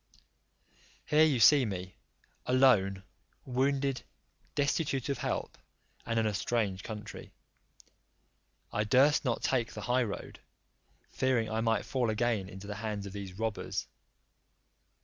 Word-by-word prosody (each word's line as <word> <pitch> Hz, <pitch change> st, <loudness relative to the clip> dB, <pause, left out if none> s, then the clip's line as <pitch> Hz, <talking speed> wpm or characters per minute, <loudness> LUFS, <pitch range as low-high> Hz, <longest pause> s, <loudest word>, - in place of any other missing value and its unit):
Here 155 Hz, +1 st, +5 dB
you 140 Hz, -6 st, +2 dB
see 140 Hz, +5 st, +7 dB
me, 95 Hz, -4 st, -4 dB, 0.5 s
alone, 105 Hz, -7 st, +4 dB, 0.4 s
wounded, 135 Hz, 0 st, 0 dB, 0.5 s
destitute 140 Hz, -2 st, 0 dB
of 140 Hz, -, -1 dB
help, -, -, -3 dB, 0.5 s
and 115 Hz, -1 st, -1 dB
in 110 Hz, -, +2 dB
a 105 Hz, -, 0 dB
strange 100 Hz, -1 st, -1 dB
country. 105 Hz, 0 st, -8 dB, 1.4 s
I 105 Hz, -, +1 dB
durst 135 Hz, +7 st, +4 dB
not 125 Hz, -4 st, -1 dB
take 120 Hz, -4 st, 0 dB
the 105 Hz, -, -6 dB
high 125 Hz, +4 st, +1 dB
road, 110 Hz, -5 st, -5 dB, 0.7 s
fearing 125 Hz, -4 st, 0 dB
I 110 Hz, +1 st, 0 dB
might 115 Hz, 0 st, +1 dB
fall 125 Hz, -4 st, 0 dB
again 110 Hz, -3 st, 0 dB
into 95 Hz, 0 st, -10 dB
the 105 Hz, 0 st, -6 dB
hands 105 Hz, -2 st, -4 dB
of 100 Hz, -, -8 dB
these 100 Hz, -2 st, -6 dB
robbers. 110 Hz, -1 st, -2 dB
115 Hz, 130 wpm, -31 LUFS, 105-130 Hz, 1.4 s, see